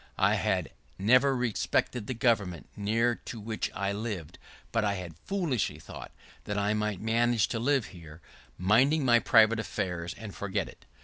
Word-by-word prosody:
I - - +3
had - - 0 0.3
never 130 +7 +4
respected 120 -2 -1
the 130 - -3
government 105 - 0
near 115 +4 +1
to 115 - -6
which 110 +1 -3
I 100 +1 -1
lived, 100 -6 -5 0.3
but 115 -1 +1
I 100 -1 +1
had 90 -4 -7
foolishly 155 - -1
thought 75 - -10 0.3
that 105 - -3
I 100 +1 +1
might 105 -2 -1
manage 115 0 +2
to 115 - -2
live 135 0 +2
here, 80 -3 -12 0.4
minding 130 - +3
my 120 -1 +6
private 110 0 +5
affairs, 90 -6 -3
and 110 -3 -8
forget 100 -1 -2
it. - - -15
110 Hz, 165 wpm, -29 LUFS, 100-120 Hz, 0.4 s, my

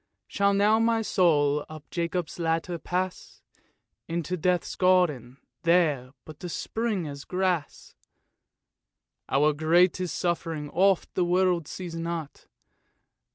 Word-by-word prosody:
Shall 200 0 +1
now 210 +2 +4
my 225 0 +2
soul 150 -8 +2
up 155 -1 -11
Jacob's 170 0 -3
ladder 165 +1 -1
pass 185 +2 -4 0.6
Into 170 +1 -2
Death's 180 +1 0
garden, 155 -10 +2 0.2
there 160 -7 +2 0.2
but 155 -1 -12
to 180 - -6
spring 215 -2 -2
as 140 -1 -7
grass? 180 -4 -2 0.7
" - - -50
Our 150 +2 +3
greatest 175 +3 +2
suffering 165 -4 -2
oft 190 +1 +2
the 180 - +1
world 175 -2 +1
sees 180 -3 -7
not. 165 -2 -5
170 Hz, 115 wpm, -27 LUFS, 155-185 Hz, 0.7 s, now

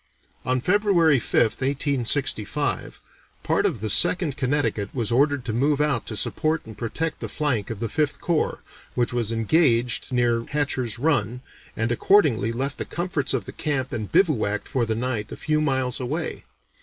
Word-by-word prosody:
On 130 0 +1
February 180 - +3
5th 115 0 +1
(1865), 135 -1 0 0.4
part - - +2
of 110 - -4
the 110 - -2
Second 170 -6 +3
Connecticut 130 -7 0
was 120 -3 -1
ordered 140 +1 +2
to 110 - -2
move 140 +5 +1
out 150 -5 0
to 110 - -3
support 155 +9 -1
and 110 -1 -10
protect 150 +9 -3
the - - -5
flank 130 -9 -1
of 110 - -5
the 115 - -2
Fifth 150 +3 -1
Corps, 170 -3 -1 0.3
which 120 -1 0
was 115 -2 0
engaged 120 +1 +2
near 120 -2 +1
Hatcher's 130 -6 -1
Run, 125 -4 0 0.4
and 115 +2 0
accordingly 120 - +3
left 135 +4 -3
the - - -2
comforts 170 -5 -2
of 115 -7 -3
the - - -7
camp 135 -4 -2
and 110 -3 -4
bivouacked 110 - +2
for 120 -4 -1
the 110 - 0
night 115 -2 -3
a - - -6
few 155 -1 0
miles 130 -4 0
away. 150 +6 -4
130 Hz, 170 wpm, -24 LUFS, 115-150 Hz, 0.4 s, February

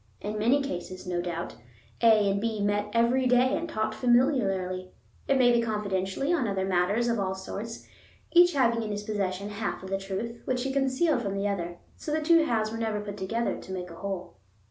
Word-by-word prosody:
In 210 +1 -4
many 255 +6 +3
cases, 185 -5 -5
no 175 -1 -1
doubt, 175 -1 -4 0.5
A 215 -3 +5
and 200 0 -1
B 225 -1 -1
met 205 +1 0
every 235 +3 +3
day 250 +1 +4
and 335 0 -3
talked 215 -5 -1
familiarly, 215 -7 +1 0.4
it 275 - +3
may 245 -2 +5
be 235 -1 +3
confidentially, 210 - -1
on 280 -9 +1
other 195 -2 -1
matters 190 +5 +1
of 230 -2 +1
all 190 -1 -1
sorts, 205 +4 -7 0.4
each 350 0 +6
having 235 -4 +2
in 220 - -4
his 205 0 -3
possession 200 -2 -2
half 205 -2 -4
of 190 - -8
the 195 - 0
truth, 200 +5 -5
which 250 -1 -1
he 265 0 -2
concealed 270 +1 +2
from 200 -3 -3
the 200 +1 0
other. 175 -3 -3 0.2
So 300 - -5
the 310 - +1
two 330 +1 +5
halves 220 -5 0
were 225 - -5
never 220 -2 -1
put 205 -1 -6
together 225 +5 -2
to - - -10
make 180 -2 -5
a - - -9
whole. 190 - -5
215 Hz, 210 wpm, -28 LUFS, 195-245 Hz, 0.5 s, each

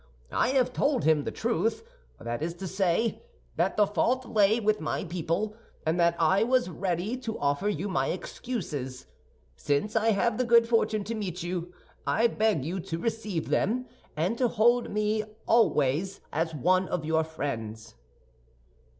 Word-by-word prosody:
I - - +2
have 255 -1 +2
told 280 -3 +1
him 155 -2 +3
the - - -2
truth; 230 - -1 0.3
that 120 +2 -4
is 165 +2 -2
to 190 - -7
say, 190 +4 0 0.3
that - - 0
the 210 - +6
fault 245 +5 0
lay 215 0 +3
with 215 -3 +1
my 155 - -2
people, 175 +5 -2 0.3
and 160 +3 +1
that 170 0 +4
I 180 +4 +3
was 245 -3 +2
ready 180 +5 -2
to 230 -3 -5
offer 145 +8 0
you 200 -1 -2
my 135 -9 0
excuses. 145 - -4 0.5
Since 145 - -1
I 225 0 +3
have 220 +2 +1
the - - +3
good 235 -1 +5
fortune 220 -2 +1
to 220 +4 -4
meet 185 -5 -4
you, 175 0 -3 0.4
I 230 - +3
beg 215 - +1
you 180 +4 -2
to 165 -2 -4
receive 210 -4 -3
them, 250 +5 +1 0.3
and 185 +9 0
to 250 - +4
hold 240 +2 +3
me 215 +1 0 0.2
always 185 - +2
as 165 +1 -1
one 185 +6 +2
of 170 -3 -2
your 160 0 +2
friends." 115 -9 -5
195 Hz, 165 wpm, -28 LUFS, 160-225 Hz, 0.5 s, the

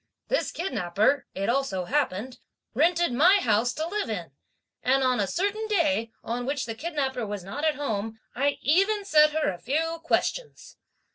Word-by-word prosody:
This - - 0
kidnapper, 215 - 0
it 195 - -2
also 235 -8 0
happened, 255 -2 -1 0.3
rented 335 +2 +2
my 340 +10 +6
house 235 - +2
to 315 - -3
live 410 - -2
in; 180 -9 -4 0.5
and 265 +1 +2
on 255 -2 +2
a 200 - +1
certain 405 - -1
day, 300 - +1
on 245 +2 -3
which 280 0 -1
the 225 - -4
kidnapper 270 -3 -2
was 205 -2 -5
not 210 +11 -6
at 310 -1 +2
home, 225 -6 -3 0.2
I 280 +2 0
even 395 +7 +2
set 305 -5 +6
her 305 -4 0
a 175 - -10
few 325 +5 -1
questions. 460 +8 -2
275 Hz, 165 wpm, -26 LUFS, 225-330 Hz, 0.5 s, my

